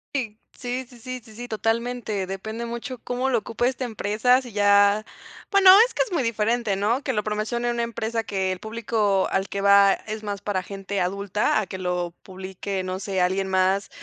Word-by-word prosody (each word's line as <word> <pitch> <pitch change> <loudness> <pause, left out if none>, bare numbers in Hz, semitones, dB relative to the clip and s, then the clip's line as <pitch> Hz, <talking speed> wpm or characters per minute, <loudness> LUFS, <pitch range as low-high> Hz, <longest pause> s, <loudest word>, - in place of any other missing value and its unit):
Sí. 225 -5 -3 0.2
Sí 250 +1 -4
sí 245 -2 -16
sí 255 +1 -6
sí 230 +3 -10
totalmente. 225 -2 -1
Depende 220 +5 -5
mucho 235 +2 -5
cómo 250 +2 -2
lo 240 -3 +2
ocupe 235 +3 -1
esta 260 0 -2
empresa. 235 +2 +2
Sí, 245 -5 -11
ya 205 0 +4 0.5
bueno, 395 -1 +7 0.2
es - - -8
que - - 0
es 430 -7 -8
muy 285 -7 +1
diferente, 225 -2 0
¿no? 225 +7 0
Que 265 - -1
lo 210 -4 -1
promocione 215 +3 -1
una 235 0 -1
empresa 230 -1 -2
que 190 -2 -1
el 180 - -9
público 220 -3 0
al 195 0 0
que 200 - -3
va 200 0 +6
es 215 0 -6
más 205 -1 -4
para 195 -3 -2
gente 195 0 -4
adulta, 200 +3 0
a 205 - -3
que 190 - -6
lo 180 -1 -2
publique, 190 0 -5
no 185 0 -3
sé, 190 -1 -2
alguien 190 +2 +1
más 190 +1 +1
215 Hz, 195 wpm, -24 LUFS, 195-235 Hz, 0.5 s, bueno